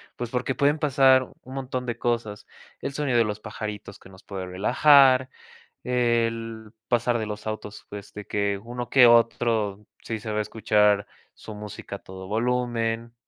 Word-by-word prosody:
Pues, 120 -1 -5
porque 125 +1 -1
pueden 145 +1 +2
pasar 135 -2 +5 0.2
un 130 - -11
montón 130 -2 -4
de 120 -1 -3
cosas. 115 -3 -2 0.3
El 135 - -3
sonido 135 -4 +1
de - - +5
los 105 -1 -4
pajaritos 105 -2 -7
que - - -16
nos 95 0 -16
puede 95 -2 -6
relajar, 130 +7 +5 0.5
el 115 -2 -1 0.2
pasar 120 -1 +1
de 110 - -3
los 105 0 -6
autos, 105 -1 -6
pues, 100 0 -9
de 105 0 -8
que 100 -1 -1
uno 120 0 -6
que 130 -1 +7
otro, 115 -3 +2 0.2
sí 115 -1 -4
se 110 0 -6
va 105 - -1
a - - +2
escuchar 105 -1 +2 0.3
su 110 - -10
música 105 -1 -8
a - - -22
todo 95 0 -10
volumen. 115 0 -1
115 Hz, 170 wpm, -25 LUFS, 105-125 Hz, 0.5 s, que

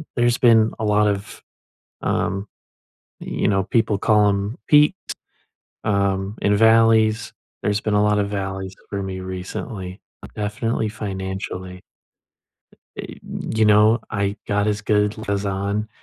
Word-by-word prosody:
there's 120 -1 +2
been 115 -2 +5
a 110 - -1
lot 105 0 +3
of, 100 0 -3 0.6
um, 100 +2 -1 0.7
you - - -2
know, 95 -2 +2
people 110 -1 +1
call 105 0 +4
'em 100 +3 -2
peaks, 150 +4 +5 0.9
um, 100 0 0
and 105 0 +3
valleys, 115 0 +4 0.3
there's 105 0 0
been 110 - -1
a 105 - +4
lot 105 0 +2
of 100 -1 0
valleys 95 -1 -4
for 100 -1 -3
me 95 -1 -5
recently, 95 +1 -6 0.4
definitely 110 +2 -2
financially. 95 -3 -6 1.1
Eh, - - -7 0.4
you 110 0 +3
know, 105 +2 +5
I 100 0 -1
God 105 +1 +1
is 105 0 -1
good 105 -1 +1
'cause 100 -1 -2
on 100 +2 -2
105 Hz, 130 wpm, -21 LUFS, 100-110 Hz, 1.1 s, been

